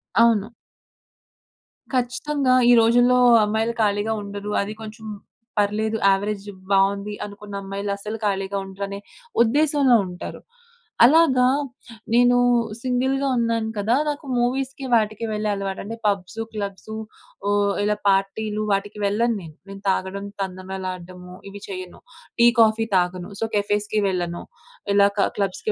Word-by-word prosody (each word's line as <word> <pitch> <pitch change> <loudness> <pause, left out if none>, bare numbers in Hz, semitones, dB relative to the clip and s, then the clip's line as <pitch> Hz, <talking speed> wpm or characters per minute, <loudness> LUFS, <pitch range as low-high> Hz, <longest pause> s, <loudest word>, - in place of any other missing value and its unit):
అవును. 225 -1 +4 1.4
ఖచ్చితంగా 255 +2 0 0.2
ఈ - - +8
రోజుల్లో 245 +2 +4 0.3
అమ్మాయిలు 220 +2 0
ఖాళీగా 205 +1 +1
ఉండరు, 205 +1 -6
అది 200 +2 -4
కొంచెం 220 0 -9 0.5
పర్లేదు 215 +2 +1
యావరేజ్ 200 +1 0 0.3
బావుంది 200 +1 +2
అనుకున్న 205 0 -9
అమ్మాయిలస్సలు 200 +2 -4
ఖాళీగా 195 0 -1
ఉండరనే 200 +1 -6 0.4
ఉద్దేశంలో 280 +1 +3
ఉంటారు. 180 0 -8 0.6
అలాగా, 265 -3 +5 0.7
నేను 245 +1 +5 0.4
సింగిల్‌గా 265 +2 0
ఉన్నాను 230 -1 0
కదా! 220 +4 +2
నాకు 295 +1 -5
మూవీస్‌కి 265 +2 -1
వాటికి 215 0 0
వెళ్ళే 210 0 -1
అలవాటు. 195 -1 -4
అంటే 225 +3 -6
పబ్స్, 200 +2 -2
క్లబ్స్ 200 -1 -6 0.6
ఓహ్! 205 0 +2
ఇలా 210 0 +1
పార్టీలు 210 +2 0
వాటికి 205 +1 -1
వెళ్ళను 225 +4 +1
నేను. 160 -3 -11
నేను 195 0 -9
తాగడం, 190 +1 -2 0.2
తందనాలడము 185 -1 -6
ఇవి 200 +1 -10
చేయను. 185 -2 -8 0.4
టీ, 235 - +7
కాఫీ 225 0 +3
తాగను 180 +2 -1
సో, 225 - +1
కెఫేస్‌కి 210 +1 0
వెళ్ళను 175 -2 -3 0.5
ఇలా 200 0 +6
క - - +3
క్లబ్స్‌కి 200 - -1
210 Hz, 120 wpm, -23 LUFS, 195-230 Hz, 1.4 s, ఈ